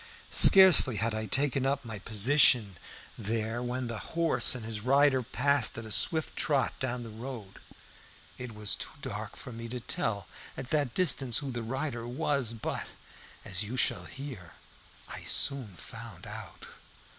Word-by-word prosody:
Scarcely 185 - +8
had 110 +2 -1
I 110 0 -4
taken 135 +3 +1
up 140 0 -1
my 110 -3 -7
position 110 - +4 0.4
there 110 +2 -3
when 125 +1 -4
the 115 -2 -5
horse 160 -7 +1
and 120 -3 -7
his 110 -2 -4
rider 135 +2 +3
passed 135 0 +1
at 115 - -7
a 110 - -9
swift 155 - +1
trot 140 -3 0
down 125 -2 -3
the 115 - -10
road. 110 -3 -9 0.8
It 125 -3 -8
was 105 -1 -1
too - - -3
dark - - -6
for - - -10
me 115 0 -8
to 125 +1 -5
tell 105 -4 -3 0.3
at 130 - -8
that 145 -6 -1
distance 135 -10 +2
who 140 -2 -4
the 120 -1 -5
rider 120 0 -5
was, 135 -2 -2
but, 115 - -5 0.6
as 95 - -2
you 110 +5 -4
shall - - +1
hear, 130 - -10 0.5
I - - -9
soon 130 -9 0
found - - -8
out. - - -10
120 Hz, 160 wpm, -29 LUFS, 110-135 Hz, 0.8 s, Scarcely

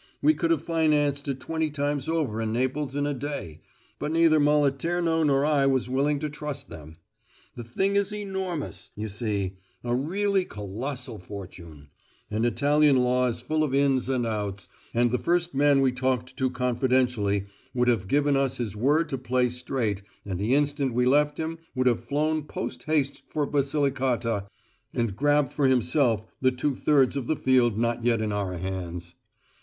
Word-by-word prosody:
We 150 +2 +4
could 165 +2 -1
have 165 -2 +1
financed 150 -4 +1
it 135 -1 -2
twenty 160 +1 -2
times 145 -1 -2
over 145 -10 -1
in 110 -1 -1
Naples 130 +3 -1
in 145 0 0
a 145 - 0
day, 135 - -5 0.4
but 150 - -2
neither 165 -1 +4
Moliterno 150 +3 +2
nor 140 -1 +3
I 145 -2 +3
was 130 -2 +1
willing 145 +3 +2
to 155 - -1
trust 145 -2 -6
them. 80 +1 -11 0.6
The 120 - -6
thing 190 - 0
is 200 0 +1
enormous, 190 -6 -4
you 110 +1 -4
see 100 -3 -2 0.3
a 120 0 -1
really 190 +8 +1
colossal 115 - -6
fortune 85 -6 -10 0.4
and 110 +3 +1
Italian 145 +4 +3
law 125 0 +2
is 120 -1 -3
full 155 +5 0
of 140 -3 0
ins 135 -2 +2
and 125 -3 +1
outs, 105 -3 -3 0.2
and 120 0 +2
the 125 - +1
first 175 0 0
man 140 0 +4
we 130 -1 +3
talked 130 0 -1
to 130 0 0
confidentially 125 -5 +1 0.3
would 125 0 +2
have 115 -6 +1
given 145 +4 +2
us 135 -1 +1
his 115 -5 -3
word 145 +9 +2
to 135 -4 -3
play 125 0 +1
straight, 120 -4 -2 0.2
and, 95 -3 -4
the 110 +6 +2
instant 145 -3 +1
we 125 0 +3
left 145 +3 +3
him, 160 +1 -4 0.2
would 130 0 +1
have 120 -3 +2
flown 155 +1 0
post 125 -4 -5
haste 145 -3 0
for 150 -1 -1
Basilicata 130 -7 0 0.5
and 115 -5 -1
grabbed 145 +1 +2
for 140 -2 +2
himself 125 -3 +2 0.2
the 130 - +5
two 130 +3 -1
thirds 135 -1 +3
of 135 -4 -3
the 155 - +1
field 125 -6 +3
not 115 0 0
yet 120 -1 +2
in 110 -1 -1
our 100 -3 -2
hands. 90 -2 -5
130 Hz, 175 wpm, -26 LUFS, 115-150 Hz, 0.6 s, the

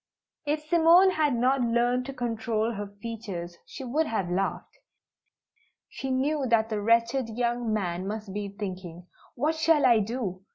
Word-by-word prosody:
If 300 +1 0
Simone 340 +4 +5
had 300 -6 +1
not 255 +3 +2
learned 240 +2 +1
to 275 - -5
control 230 -2 -1
her 205 -2 -5
features 200 -5 -7
she 275 - -8
would 300 +6 0
have 195 -6 -2
laughed. 195 +2 -3 1.1
She 270 - -6
knew 270 +2 0
that 225 -1 +2
the 215 -2 -2
wretched 230 +3 +2
young 240 0 -1
man 185 -3 -2
must 210 -1 -5
be 205 0 -3
thinking, 185 -4 -6 0.3
"What 300 +6 +1
shall 320 -2 +3
I 235 -3 +6
do? 205 -4 -3
235 Hz, 155 wpm, -27 LUFS, 205-265 Hz, 1.1 s, I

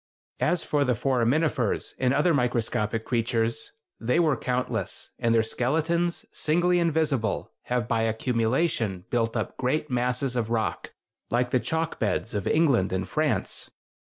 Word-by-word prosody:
As 175 +1 +1
for 145 -1 +1
the 125 -3 +1
foraminifers 130 +1 +1
and 125 -1 +2
other 150 +5 +3
microscopic 115 -4 0
creatures, 115 -1 0 0.3
they 125 +8 +1
were 155 -5 +3
countless, 125 -5 -2
and 115 0 +2
their 115 - +4
skeletons, 160 +9 0
singly 175 +3 +2
invisible, 150 - 0
have 125 -3 -1
by 115 -2 +1
accumulation 115 - 0
built 115 -1 0
up 110 - -3
great 140 +3 -1
masses 125 +1 0
of 115 -2 -1
rock, 115 -1 -2 0.3
like 125 +1 +1
the 130 - +3
chalk 160 +7 -2
beds 110 +1 -1
of 100 -3 -2
England 140 - +3
and 95 0 -2
France. 145 -9 -1
125 Hz, 140 wpm, -26 LUFS, 115-150 Hz, 0.3 s, their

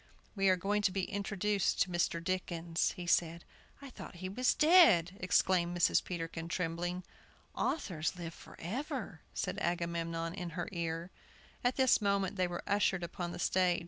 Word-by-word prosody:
"We 195 -1 +3
are 185 - +5
going 205 +3 0
to 200 - +2
be 190 0 -1
introduced 205 0 0
to - - -10
Mr. 175 -1 0
Dickens," 170 -2 -1
he 180 - -7
said. 170 -1 +1 0.4
"I 275 - -9
thought - - -10
he 185 +2 -5
was 250 +6 +1
dead!" 270 - +6
exclaimed 180 -1 +2
Mrs. 170 - +3
Peterkin 165 -1 -5
trembling. 175 +1 -2 0.5
"Authors 180 - -1
live 170 -2 -6
forever!" 240 - -6
said 185 +2 -2
Agamemnon 170 -1 -2
in 180 -2 -5
her 175 - -2
ear. 170 0 -3 0.5
At 245 +1 +2
this 260 -4 +4
moment 200 -1 +1
they 185 -2 +1
were 175 0 -5
ushered 195 -3 +1
upon 175 0 -4
the - - -6
stage. 180 -1 +2
180 Hz, 160 wpm, -33 LUFS, 170-200 Hz, 0.5 s, dead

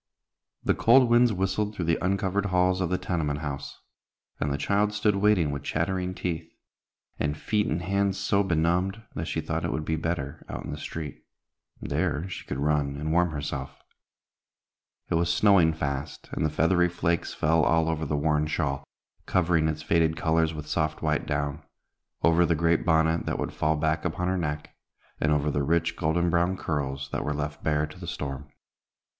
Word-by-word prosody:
The - - +3
cold 120 +1 +5
winds 120 0 +5
whistled 100 +2 -1
through 90 - -2
the 85 +2 +1
uncovered 100 +1 0
halls 90 0 +2
of 90 - 0
the 90 - +1
tenement 80 -5 -2
house, 70 -2 -5 0.6
and 75 - 0
the 70 - 0
child 105 +7 +1
stood 105 -1 +1
waiting 100 -7 +3
with 70 -1 -4
chattering 90 +5 -1
teeth, 80 -3 -3 0.7
and 75 0 -1
feet 105 +4 0
and 85 +3 -1
hands 100 +1 +1
so 100 +1 +2
benumbed 90 +4 0
that 80 +2 -4
she 80 - -1
thought 80 +1 -3
it - - -1
would 80 - -3
be 80 - 0
better 80 -4 -3
out - - -5
in - - -5
the - - -5
street. 75 -4 -6 0.6
There 75 +5 -1
she - - -6
could 70 - -3
run 70 -1 0
and 75 +2 -2
warm 90 +1 +3
herself. 70 -3 -5 1.3
It 85 - +3
was 85 0 +1
snowing 90 -2 +5
fast, 70 -3 -4
and - - -2
the 75 - +2
feathery 90 +3 +3
flakes 85 -1 -1
fell 80 +1 +2
all 80 +1 +3
over 80 -1 -1
the 75 - 0
worn 75 0 +1
shawl, 70 -3 -1 0.4
covering 85 -3 +2
its 75 0 -3
faded 80 0 +2
colors 80 0 +2
with 75 -2 -6
soft 80 -1 -1
white - - 0
down; 70 -1 -2 0.6
over 85 +1 +5
the 85 -1 +2
great 85 +1 +2
bonnet 80 0 +2
that - - -1
would - - -3
fall 80 +1 +1
back 80 +1 0
upon 90 +1 -1
her 95 - 0
neck; 75 -2 -4 0.4
and 75 - +1
over 75 0 +2
the 70 - 0
rich, 85 +3 +1
golden 85 +1 +1
brown 85 +2 +2
curls, 70 -4 -3
that - - -2
were 75 - -2
left 75 0 -4
bare 75 -1 +1
to 75 - -12
the - - -8
storm. 70 0 -5
80 Hz, 185 wpm, -27 LUFS, 75-90 Hz, 1.3 s, cold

